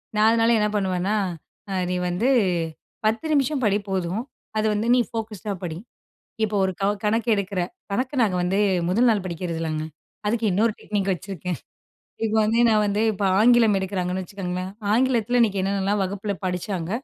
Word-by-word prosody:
நான் 210 +1 +4
அதனால 230 0 +3
என்ன 210 - +2
பண்ணுவேன்னா, 190 0 0 0.5
அ - - -3 0.2
நீ - - 0
வந்து 180 +8 0 0.8
10 225 +7 +1
நிமிஷம் 280 -1 +1
படி 205 -2 +3
போதும், 190 +2 -1 0.4
அது 215 - +1
வந்து 210 +2 -1
நீ - - +4
ஃபோகஸ்ட் 220 -3 -6
டா 205 - 0
படி, 165 -2 -4 0.7
இப்போ 215 -1 0
ஒரு 190 - -1
கவ 200 +1 +3
கணக்கு 225 +2 +1
எடுக்கிற. 200 -1 -2 0.3
கணக்கு 255 +7 -1
நாங்க 195 -5 +1
வந்து 190 +3 +1 0.3
முதல் 230 +7 +3
நாள் 210 -4 +2
படிக்கிறதில்லங்க. 165 -3 -3 0.4
அதுக்கு 225 +1 0
இன்னொரு 215 +4 +2
டெக்னிக் 200 -2 -1
வச்சிருக்கேன். 180 -1 -5 0.7
இப்போ 220 0 0
வந்து 225 +2 +2
நான் 215 -1 +4
வந்து 205 +1 0
இப்போ 200 +1 -2
ஆங்கிலம் 230 -2 +5
எடுக்கிறாங்கன்னு 185 -1 -2
வச்சுக்கோங்களேன், 185 -1 -5 0.2
ஆங்கிலத்தில 245 -1 +2
இன்னைக்கு 205 -4 +2
என்னென்னலாம் 195 +1 0
வகுப்பில 200 +2 -3
படிச்சாங்க, 180 -1 -3
200 Hz, 160 wpm, -24 LUFS, 185-220 Hz, 0.8 s, ஆங்கிலம்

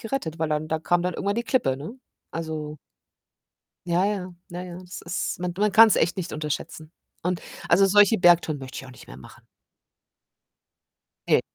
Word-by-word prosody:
gerettet, 215 - -4
weil 160 0 0
dann 150 0 -1
da 160 - 0
kam 175 +2 +1
dann 180 +1 -1
irgendwann 200 +4 -2
die 235 - -1
Klippe, 235 - +1
ne? 160 - -8 0.3
Also 155 -2 -5 1.1
Ja, 175 +2 +2
ja. 190 -3 -3 0.2
Na 175 0 -6
ja, 175 -1 -8
das 185 0 -9
ist 170 +1 -3
man 180 0 -3
man 210 +1 +2
kann's 220 0 +7
echt 170 +3 +1
nicht 185 - -4
unterschätzen. 155 +1 -5 0.3
Und 180 0 -2 0.3
also, 190 +3 +6
solche 205 +3 +5
Bergtouren 175 -4 +4
möchte 130 -1 -8
ich - - -7
auch 130 - -12
nicht 125 - -15
mehr - - -11
machen. 65 - -15 1.8
Ne. - - +4
175 Hz, 175 wpm, -25 LUFS, 155-195 Hz, 1.8 s, kann's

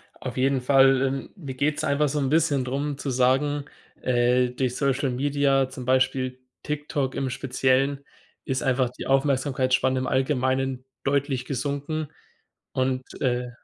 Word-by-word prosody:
Auf - - -7
jeden 135 0 +2
Fall. 135 0 +5
Ähm, 135 0 -1
mir 140 -9 -7
geht's 150 +4 0
einfach 145 -1 +2
so 150 - -1
'n 135 -2 0
bisschen 150 -4 +2
drum 140 +2 -2
zu 140 - -4
sagen, 135 +3 +2 0.4
äh, 125 0 +2
durch 125 0 -2
Social 140 0 +1
Media, 135 0 +1
zum 130 -1 -8
Beispiel 130 0 +1 0.2
TikTok 150 -2 -2
im 135 -1 -1
Speziellen, 135 +2 0 0.4
ist 130 0 -1
einfach 130 -1 +2
die 125 - -8
Aufmerksamkeitsspanne 130 -1 +2
im 130 - -2
Allgemeinen 130 -1 0 0.2
deutlich 135 -2 0
gesunken. 145 +3 -3 0.7
Und, 130 0 0 0.2
äh 125 -1 0
135 Hz, 140 wpm, -25 LUFS, 130-140 Hz, 0.7 s, Fall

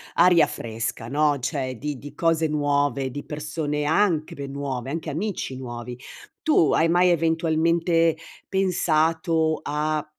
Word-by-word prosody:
aria 175 0 +6
fresca, 115 0 -5
no, 145 0 +2
cioè 130 -1 -3
di 145 -1 -4
di 145 - -10
cose 165 -1 +2
nuove, 145 -2 0
di 145 +3 -6
persone 150 0 -3
anche 160 -1 +1
pe 140 0 -6
nuove, 135 -2 -4
anche 160 0 -4
amici 170 -4 -3
nuovi. 120 -1 -7 0.5
Tu 295 - +4
hai 165 - +3
mai 180 +1 +4
eventualmente 165 0 +2 0.3
pensato 165 -3 +1
a 150 +1 -1
155 Hz, 130 wpm, -24 LUFS, 140-165 Hz, 0.5 s, aria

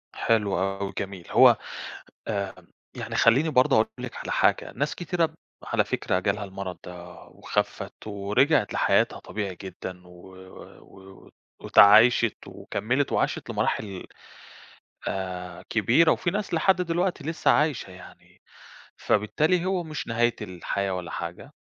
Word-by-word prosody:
حلو 105 -5 +1
أوي 95 +1 -2
جميل، 95 -3 -5
هو - - +7 0.7
آآ، 100 -3 -2 0.4
يعني - - -6
خلّيني 135 +8 +4
برضه 130 -4 +4
أقول 110 - +4
لِك - - -7
على - - -5
حاجة، - - +1
ناس 145 +3 -1
كتيرة 175 -1 0
ب 160 - -17 0.3
على - - +1
فكرة 90 - -1
جالها 100 +2 -1
المرض 95 -1 -7
ده 90 0 -10
وخفِّت - - -4
ورِجعِت 105 +9 +1
لحياتها - - +2
طبيعي 100 -4 -5
جدًا 90 -1 -8
و 90 +1 -15 0.5
و - - -18 0.3
و - - -17 0.3
واتعايشِت 110 +4 +6
وكمّلت 130 +5 -2
وعاشِت - - -1
لمراحل 100 -4 -2 1.0
آآ 90 -2 -5
كبيرة، 120 - +4
وفي 175 - 0
ناس 205 -3 -3
لحد 185 +3 +3
دلوقتي 175 -2 -1
لسّه 160 -1 +1
عايشة 145 -10 +1
يعني، 90 - -16 0.6
فبالتالي 155 - +1
هو 185 -2 0
مش 155 -2 -6
نهاية 120 +1 +1
الحياة 95 +2 -3
ولا 90 -2 -5
حاجة، - - -6
105 Hz, 135 wpm, -26 LUFS, 95-150 Hz, 1.0 s, هو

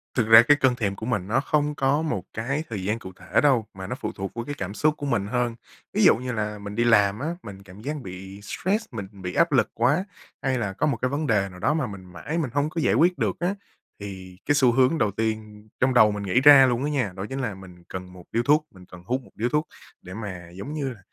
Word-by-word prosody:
Thực 115 -4 +1
ra 115 +1 +10
cái 145 +3 +5
cơn 130 -3 +3
thèm 100 -4 -1
của 110 - -7
mình 100 -7 -1
nó 120 +5 +2
không 150 +1 0
có 140 +3 +2
một 100 - -2
cái 135 +8 -2
thời 100 -5 -4
gian 110 +4 -1
cụ 95 - -9
thể 90 - +1
đâu, 130 -7 +3
mà 95 0 -7
nó 125 - -3
phụ - - -3
thuộc 95 -1 -5
vô 115 - -4
cái 145 - -5
cảm 100 +1 -4
xúc 150 +6 +2
của 145 - -5
mình 110 -7 0
hơn. 120 0 -1 0.4
Ví - - +2
dụ - - +7
như 125 +1 -4
là 105 -2 -3
mình 100 0 -7
đi 120 - +2
làm 105 -2 +4
á, 150 - -3 0.2
mình 100 -2 -10
cảm 95 +2 -13
giác 150 +5 -3
bị 95 +1 -9
stress, 200 - -2
mình 100 -4 -6
bị 90 -3 -7
áp 170 -2 +3
lực 130 - +3
quá, 145 +11 +2 0.4
hay 130 -1 0
là 100 -5 -2
có - - 0
một 130 -6 0
cái 130 - +1
vấn 145 +1 -2
đề 100 -3 +2
nào 90 0 -12
đó 145 +10 +2
mà 150 -6 -1
mình 95 -2 -9
mãi 90 - -5
mình 150 -7 -1
hông 145 +1 +1
có 165 0 -3
giải - - +2
quyết 180 +2 +3
được - - -1
á, 180 +3 0 0.4
thì 95 -2 -9
cái 145 - +2
xu 130 -4 +5
hướng 130 +6 +3
đầu 105 -6 +1
tiên 110 0 -4
trong 130 0 +2
đầu 110 -4 +6
mình 105 0 -4
nghĩ 110 +7 +2
ra 140 -2 +9
luôn 125 +2 0
á 150 - 0
nha, 125 -10 0
đó 95 +1 -5
chính 135 +1 -4
là 120 -6 -2
mình 90 -2 -14
cần 90 -1 -8
1 90 -1 -12
điếu 115 +1 +1
thuốc, 150 +3 +3
mình 95 -2 -15
cần 90 -1 -13
hút 130 +4 -1
1 - - -19
điếu 120 +3 -1
thuốc 150 +2 0 0.3
để 90 - -10
mà, 90 -5 -7
giống 115 +11 -7
như 140 -3 -2
là, 105 - -17
115 Hz, 280 wpm, -25 LUFS, 100-140 Hz, 0.4 s, ra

